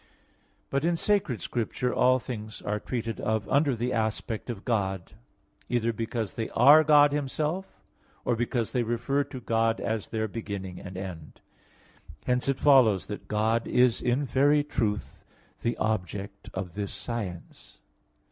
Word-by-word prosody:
But 140 +1 0
in 170 0 +2
sacred 190 - +1
science, 120 0 -3
all 130 +1 +5
things 110 -3 -6
are 105 0 -1
treated 115 0 -4
of 110 -2 -1
under 140 -2 +2
the 120 +2 -2
aspect 110 +1 -2
of 110 -4 -6
God: 95 -6 -1 0.6
either 115 -1 +1
because 115 -1 -3
they 115 - -3
are 145 +6 +8
God 145 -1 +6
Himself 150 +6 -3 0.4
or 120 - +2
because 120 0 -1
they 125 - +1
refer 120 +5 0
to 135 -2 -8
God 115 -1 +1
as 110 -1 -2
their 110 -1 -2
beginning 100 -4 -6
and 95 -1 -8
end. 90 -5 -8 0.9
Hence 125 +2 +1
it 135 - +1
follows 125 -9 +5
that 105 - -7
God 110 +2 +1
is 125 -1 +3
in 125 +3 +1
very 145 +3 +3
truth 110 -7 -2 0.4
the 120 - -1
object 100 -1 -3
of 95 -3 -5
this 100 -1 -4
science. 100 -8 -7
115 Hz, 145 wpm, -28 LUFS, 105-130 Hz, 0.9 s, are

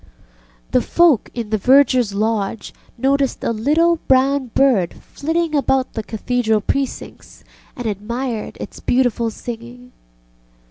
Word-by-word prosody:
ŌĆØ - - -30
The - - +3
folk 340 -9 +3
in 230 -3 -5
the 215 - +1
vergerŌĆÖs 255 -3 +4
lodge 215 0 -2 0.2
noticed 270 +1 0
a - - 0
little 310 +9 +2
brown 265 +1 +3
bird 240 -11 +3
flitting 325 +2 -3
about 270 -2 +1
the 220 - -3
Cathedral 220 0 0
precincts, 270 +6 -4 0.3
and 245 - -7
admired 225 +3 -4
its - - -8
beautiful 245 -2 +1
singing. 240 +2 -9
245 Hz, 125 wpm, -19 LUFS, 215-270 Hz, 0.3 s, vergerŌĆÖs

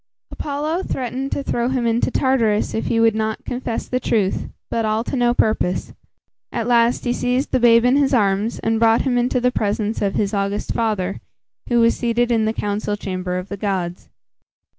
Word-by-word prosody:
Apollo 305 +4 -2
threatened 265 -3 -3
to 280 - -2
throw 240 -2 -1
him 255 -2 -1
into 230 +2 +1
Tartarus 235 -6 +1
if 220 - -2
he 230 - +1
would 225 -1 +4
not 220 0 -2
confess 245 -2 -4
the 255 - -1
truth, 205 -6 0 0.2
but 230 - 0
all 215 +1 0
to 270 - -4
no 240 -1 +3
purpose. 200 -6 0 0.6
At 230 -2 -2
last, 235 +1 +2
he 240 - +1
seized 250 +3 -1
the - - +2
babe 235 0 +5
in 250 +3 +4
his 280 -2 +2
arms, 210 -2 +1
and 225 0 0
brought 225 0 +4
him 260 -3 0
into 245 +1 +1
the 250 +1 +2
presence 215 0 -1
of 200 -1 0
his 200 -1 0
august 200 0 -1
father, 205 -4 -1 0.5
who 240 -1 +3
was 230 0 +4
seated 240 0 0
in 225 -2 +2
the 220 - +1
council 205 -1 -2
chamber 185 -2 -3
of 180 +2 -6
the 200 - -5
gods. 185 -4 -3
230 Hz, 195 wpm, -20 LUFS, 210-245 Hz, 0.6 s, babe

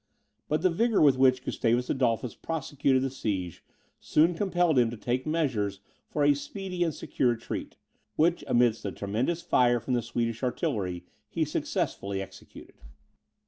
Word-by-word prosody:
But 155 +2 0
the 185 - +4
vigour 225 +5 +2
with 140 -4 +5
which 130 -1 +4
Gustavus 120 -1 0
Adolphus 125 -2 0
prosecuted 140 -4 0
the 135 - -1
siege, 95 - -3 0.4
soon 165 +3 +3
compelled 175 -5 +2
him 120 -2 +3
to 120 - -7
take 125 +5 -2
measures 120 -12 0 0.3
for 150 - 0
a 145 0 +6
speedy 180 +4 -4
and 165 - 0
secure 130 -3 -1
retreat, 120 -1 -4 0.4
which 170 +1 +2
amidst 120 -3 +2
a 100 - -3
tremendous 120 - -2
fire 120 -1 +3
from 125 - -3
the 120 - +2
Swedish 115 -1 -2
artillery 95 -8 -2 0.2
he - - 0
successfully 100 0 -2
executed. 95 - -11
130 Hz, 150 wpm, -28 LUFS, 115-155 Hz, 0.4 s, a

